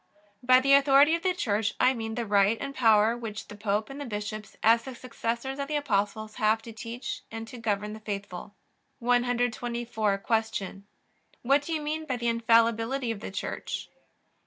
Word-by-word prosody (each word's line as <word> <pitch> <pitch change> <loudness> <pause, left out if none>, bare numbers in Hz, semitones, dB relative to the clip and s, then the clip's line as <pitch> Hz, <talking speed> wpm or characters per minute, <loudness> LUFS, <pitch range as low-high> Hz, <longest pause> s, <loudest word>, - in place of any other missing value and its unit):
By 255 +1 +6
the 275 +1 +3
authority 280 +2 +6
of 335 - 0
the 370 0 0
Church 220 - 0
I 255 - +4
mean 225 -2 -4
the 240 -1 -2
right 205 +1 +3
and 275 0 -5
power 225 -3 +4
which 225 -3 -7
the 205 - -8
Pope 210 +1 -1
and 275 +1 -8
the - - -4
bishops, 210 -2 -6
as 230 +1 +5
the 265 0 -8
successors 240 +2 -4
of 280 - -2
the 305 - -2
Apostles, 215 -5 -1
have 220 -1 +3
to 230 - -9
teach 230 +3 -6
and 225 0 -7
to 245 - -10
govern 210 -2 -2
the 215 - -8
faithful. 205 -2 -6 0.4
124. 240 -3 0 0.3
Q. 195 -1 -5 0.6
What 275 +4 +4
do 290 - -7
you 310 - -1
mean 310 +1 -3
by 255 - -1
the 235 -1 0
infallibility 230 +2 +2
of 220 - -5
the - - -6
Church? 195 - -5
230 Hz, 180 wpm, -28 LUFS, 215-255 Hz, 0.6 s, By